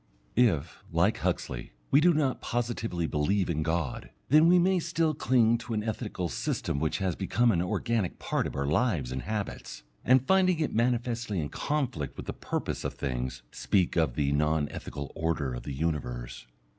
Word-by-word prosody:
If, 90 Hz, -, +2 dB
like -, -, +2 dB
Huxley, -, -, -2 dB, 0.2 s
we 140 Hz, -, +6 dB
do 175 Hz, +2 st, +6 dB
not 150 Hz, -5 st, 0 dB
positively 115 Hz, -7 st, -2 dB
believe 85 Hz, +5 st, +1 dB
in 80 Hz, -1 st, -1 dB
God, 80 Hz, -3 st, -2 dB, 0.2 s
then 155 Hz, +4 st, +6 dB
we 180 Hz, +1 st, +6 dB
may 185 Hz, +1 st, +3 dB
still 160 Hz, -1 st, 0 dB
cling 120 Hz, -5 st, +3 dB
to 115 Hz, 0 st, -4 dB
an 105 Hz, -, -1 dB
ethical 105 Hz, -5 st, -3 dB
system 70 Hz, -, -2 dB
which 80 Hz, +1 st, 0 dB
has 95 Hz, -4 st, -1 dB
become 110 Hz, +5 st, +2 dB
an 85 Hz, -5 st, +1 dB
organic 105 Hz, +2 st, -1 dB
part -, -, -1 dB
of -, -, -7 dB
our 70 Hz, -, -1 dB
lives 75 Hz, -, +1 dB
and 65 Hz, 0 st, -3 dB
habits, 105 Hz, -, -5 dB, 0.2 s
and 130 Hz, +1 st, +4 dB
finding 185 Hz, -1 st, +3 dB
it 155 Hz, -, -1 dB
manifestly 115 Hz, -3 st, 0 dB
in 75 Hz, -3 st, -2 dB
conflict 130 Hz, -, -2 dB
with -, -, -6 dB
the -, -, -4 dB
purpose -, -, -3 dB
of -, -, -3 dB
things, 65 Hz, -1 st, -3 dB
speak 95 Hz, -3 st, +1 dB
of 80 Hz, -8 st, +1 dB
the 70 Hz, -2 st, +1 dB
non 75 Hz, +1 st, +2 dB
ethical 70 Hz, -1 st, -6 dB
order 80 Hz, -5 st, -1 dB
of -, -, -5 dB
the 70 Hz, -, -6 dB
universe. 65 Hz, -6 st, -3 dB
95 Hz, 180 wpm, -29 LUFS, 75-120 Hz, 0.2 s, we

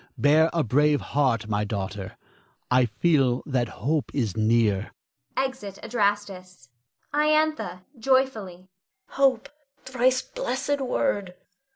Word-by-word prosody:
Bear 155 Hz, +3 st, +4 dB
a 165 Hz, -2 st, +1 dB
brave 145 Hz, +5 st, +3 dB
heart, 130 Hz, -7 st, 0 dB
my 105 Hz, -1 st, 0 dB
daughter. 100 Hz, -2 st, -5 dB, 0.5 s
I 125 Hz, 0 st, +5 dB
feel 130 Hz, +2 st, +1 dB
that 125 Hz, -4 st, 0 dB, 0.2 s
hope 150 Hz, 0 st, 0 dB
is 115 Hz, -9 st, -1 dB
near. 110 Hz, -2 st, +1 dB, 0.4 s
[Exit 260 Hz, -7 st, -3 dB
Adrastus. 200 Hz, -, -2 dB, 0.4 s
Iantha 305 Hz, -10 st, +1 dB, 0.2 s
[joyfully]. 220 Hz, -8 st, 0 dB, 0.4 s
Hope, 270 Hz, -2 st, +2 dB, 0.4 s
thrice 255 Hz, 0 st, +1 dB
blessed 270 Hz, +4 st, -2 dB
word! 205 Hz, -8 st, -1 dB
180 Hz, 100 wpm, -25 LUFS, -, 0.5 s, I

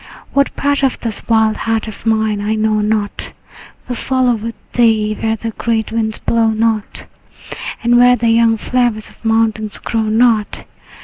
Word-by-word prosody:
What 280 Hz, 0 st, +1 dB
part 285 Hz, 0 st, 0 dB
of 265 Hz, -, +1 dB
this 225 Hz, -3 st, -3 dB
wild 220 Hz, -1 st, +3 dB
heart 225 Hz, 0 st, -1 dB
of 220 Hz, +1 st, -8 dB
mine 220 Hz, -2 st, +1 dB
I 215 Hz, +1 st, -1 dB
know 215 Hz, 0 st, +1 dB
not 210 Hz, -1 st, -2 dB, 0.5 s
Will 250 Hz, -, -3 dB
follow 255 Hz, 0 st, +1 dB
with 230 Hz, 0 st, -5 dB, 0.2 s
thee 220 Hz, -3 st, +2 dB
where 220 Hz, 0 st, 0 dB
the 225 Hz, +1 st, -5 dB
great 220 Hz, 0 st, -2 dB
winds 220 Hz, -1 st, -1 dB
blow 230 Hz, -1 st, +1 dB
not, 220 Hz, -1 st, -1 dB, 0.8 s
And 240 Hz, +1 st, +4 dB
where 245 Hz, 0 st, +6 dB
the 235 Hz, -1 st, 0 dB
young 225 Hz, 0 st, +3 dB
flowers 240 Hz, -2 st, -1 dB
of -, -, -23 dB
the 230 Hz, -, -4 dB
mountain 225 Hz, -1 st, +1 dB
grow 225 Hz, -2 st, -1 dB
not. 220 Hz, 0 st, +1 dB
225 Hz, 170 wpm, -16 LUFS, 220-235 Hz, 0.8 s, where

